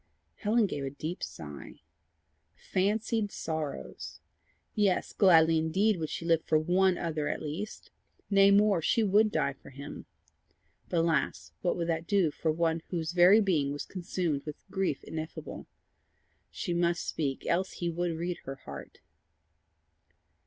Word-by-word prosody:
Helen 220 +2 +2
gave 145 -7 -3
a 135 - -2
deep 155 +5 -6
sigh. 75 -2 -8 0.7
Fancied 205 - 0
sorrows! 145 - -5 0.5
Yes, 205 -3 +1
gladly 165 -4 +5
indeed 190 +6 +2
would 160 -2 -3
she 165 - -5
live 165 -1 +3
for 155 - +2
ONE 180 +3 +3
other 155 -3 -2
at - - -2
least! 160 +8 -6 0.4
Nay 195 -1 +5
more 200 -3 +4
she 225 +8 +2
would 210 +1 +4
die 140 - 0
for - - -15
him. 140 +2 -9 0.8
But 170 - +2
alas! 165 -1 0
what 180 - 0
would 170 - -1
that 165 0 -1
do 195 -6 +3
for 160 +2 -1
one 165 0 0
whose 165 -3 -2
very 180 +5 +6
being 160 -9 +1
was 145 0 -4
consumed 175 -5 -2
with 150 -1 -8
grief 190 -8 -1
ineffable! 160 0 -7 0.8
She 175 - -3
must 170 0 0
speak, 140 -4 -2
else 185 +3 0
he 170 -1 -2
would 170 0 -2
read 175 +1 -3
her 135 - -5
heart. - - -10
170 Hz, 145 wpm, -30 LUFS, 155-190 Hz, 0.8 s, very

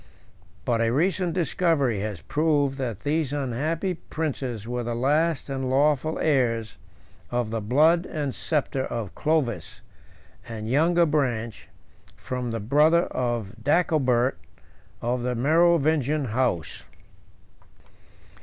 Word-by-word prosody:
But 115 -2 +1
a 115 - +2
recent 175 +5 +1
discovery 160 - +1
107 105 +2 -2 0.2
has - - -32
proved 145 -3 +1
that 120 -7 -3
these 150 -1 0
unhappy 150 +7 -1
princes 135 - -4
were 120 0 -2
the 120 0 -3
last 150 +5 +1
and 135 -2 -3
lawful 150 +3 +2
heirs 115 - 0 0.5
of 120 -3 -1
the 115 -1 -2
blood 155 - +3
and 145 -5 -3
sceptre 140 -4 -1
of 115 -5 -5
Clovis, 155 -6 -1 0.7
and 110 -1 -6
younger 170 +7 +3
branch, 125 -8 -1 0.5
from 125 -1 -4
the 115 0 -3
brother 150 +10 +4
of 120 -5 -2
Dagobert, 135 -5 +2 0.6
of 120 +1 0
the 125 0 -1
Merovingian 155 0 +2
house. 110 -9 -1
135 Hz, 115 wpm, -25 LUFS, 120-155 Hz, 0.7 s, brother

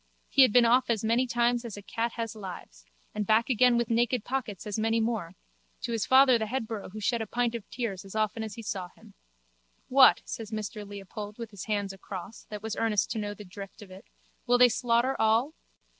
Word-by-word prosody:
He 275 - +5
had 255 - +7
been 245 +1 +6
off 245 +2 +3
as 225 -3 0
many 235 +3 +2
times 240 0 +1
as 225 -4 -7
a 205 - -9
cat 230 +3 -2
has 230 -2 -4
lives 175 - -9 0.3
and 210 - -1
back 220 +5 +2
again 245 0 +4
with 235 -1 -1
naked 235 0 +1
pockets 245 -7 -4
as 210 0 -3
many 225 +1 +1
more 220 -6 -2 0.5
to - - -2
his 225 -3 -1
father 260 -2 +6
the 220 - -2
headborough 225 -3 -4
who 215 +3 -8
shed 230 +3 0
a 220 - -4
pint 240 -1 0
of 230 -4 -7
tears 220 -7 -4
as 195 +1 -11
often 215 +1 0
as 215 -2 -5
he 230 - -8
saw 195 -4 -4
him. - - -19 0.8
What, 260 0 +6
says 225 -2 -6
Mr 215 -1 -5
Leopold 205 +1 -8
with 230 -2 -7
his 200 -3 -8
hands 205 -2 -2
across, 195 +2 -9
that 210 -1 -8
was 220 -1 -3
earnest 220 -3 +1
to 225 - -2
know 205 -1 -4
the 210 - -11
drift 200 +2 -10
of 190 - -15
it, 190 +2 -12 0.4
will 245 0 +5
they 245 0 +7
slaughter 240 +2 +1
all? 225 +7 +3
220 Hz, 220 wpm, -28 LUFS, 205-235 Hz, 0.8 s, had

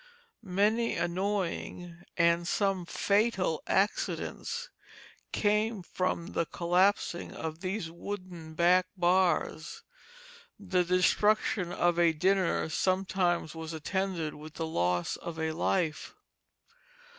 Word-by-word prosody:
Many 215 +3 +1
annoying, 175 -1 -2 0.2
and 170 0 +3
some 195 -2 0
fatal 200 -6 +1
accidents 465 - -1 0.6
came 210 -1 +1
from 185 +1 -2
the 170 - 0
collapsing 175 +1 +1
of 160 0 -5
these 185 -3 -3
wooden 175 -3 -7
back 180 +2 +4
bars. 175 -2 +1 0.8
The 185 -3 +1
destruction 185 +1 +2
of 175 -1 +1
a 170 -1 +4
dinner 185 +2 +1
sometimes 185 -1 0
was 160 0 -6
attended 170 0 -2
with 155 +1 -11
the 165 - -2
loss 90 - 0
of 170 -1 -7
a 160 0 -1
life. 165 -1 -1
180 Hz, 100 wpm, -30 LUFS, 170-195 Hz, 0.8 s, back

